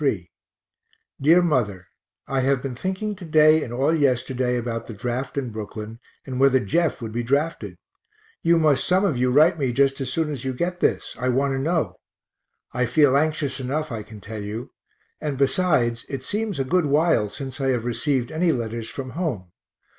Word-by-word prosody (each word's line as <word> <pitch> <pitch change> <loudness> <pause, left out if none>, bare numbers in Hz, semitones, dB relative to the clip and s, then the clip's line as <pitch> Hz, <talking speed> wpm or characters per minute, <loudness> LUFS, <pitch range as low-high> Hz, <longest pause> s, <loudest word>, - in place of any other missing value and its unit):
_ 105 - 0 0.9
DEAR 165 +5 +5
MOTHER 110 - 0 0.4
I 135 -1 0
have 135 0 +1
been 135 -2 -3
thinking 190 - -3
to 185 - -10
day 155 -1 +5
and 120 - -7
all 135 +6 +1
yesterday 130 -3 +1
about 115 -1 -4
the 115 - -7
draft 125 +6 -4
in 130 -4 -2
Brooklyn, 110 +1 -7 0.3
and 130 -2 -4
whether 135 -1 +5
Jeff 130 - 0
would 110 - -5
be 120 +2 -2
drafted; 140 +7 -1 0.6
you 170 0 +4
must 155 -4 +3
some 185 +2 +3
of 165 - +1
you 125 +1 +1
write 155 +6 +4
me 135 -3 +1
just 135 +2 +2
as 130 -2 -3
soon 160 +1 0
as 135 -4 -5
you 130 -1 -2
get 175 +6 -2
this - - 0
I 130 +1 0
want 135 +2 +1
to 135 - -1
know; 160 +3 -1 0.7
I 125 0 +1
feel 135 +2 +4
anxious 150 -2 0
enough 145 +3 -2
I 115 -2 -4
can 105 0 -11
tell 110 +1 -7
you 105 +4 -6 0.5
and 145 -3 -3
besides, 135 -5 +1
it 135 -2 -5
seems 210 +3 -2
a 135 - +1
good 165 +4 +1
while 145 -7 +2
since 135 +3 -7
I 135 - +1
have 125 -3 0
received 125 0 -1
any 165 +2 +2
letters 115 -3 -3
from 130 -2 -6
home. 125 - -3
135 Hz, 190 wpm, -23 LUFS, 120-155 Hz, 0.9 s, DEAR